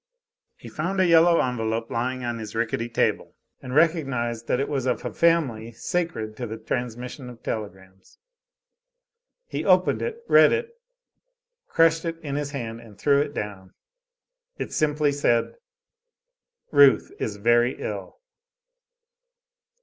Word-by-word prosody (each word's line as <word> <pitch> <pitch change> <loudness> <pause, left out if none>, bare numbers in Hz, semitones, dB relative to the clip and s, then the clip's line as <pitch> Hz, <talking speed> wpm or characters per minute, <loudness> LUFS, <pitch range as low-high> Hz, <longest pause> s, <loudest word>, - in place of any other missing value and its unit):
He - - -12
found 180 +5 -3
a 185 - +4
yellow 170 0 +5
envelope 115 -2 -1
lying 130 +2 -2
on 120 -1 -3
his 110 0 -8
rickety 115 +1 -1
table, 115 - -1 0.3
and 125 0 -6
recognized 135 -8 +1
that 125 - +1
it 140 - 0
was 135 -3 -2
of 125 - -1
a - - -4
family 130 -10 +1
sacred 165 - -3
to 120 - -4
the 110 +1 -6
transmission 125 +3 -5
of 120 -1 -13
telegrams. 95 -3 -7 1.3
He - - -4
opened - - +3
it, 470 0 -4
read - - +6
it, 460 0 -2 1.0
crushed 165 0 +3
it 165 -1 -3
in 140 -3 -4
his 145 -1 -2
hand 115 -5 -6
and 110 -4 -15
threw 140 -1 +3
it 145 0 -4
down. 95 -3 -6 0.8
It - - -5
simply 150 -1 +1
said: 120 -5 +1 1.2
"Ruth 145 -2 +5
is 105 - -3
very 120 +4 +2
ill." - - -6
125 Hz, 135 wpm, -24 LUFS, 115-155 Hz, 1.3 s, read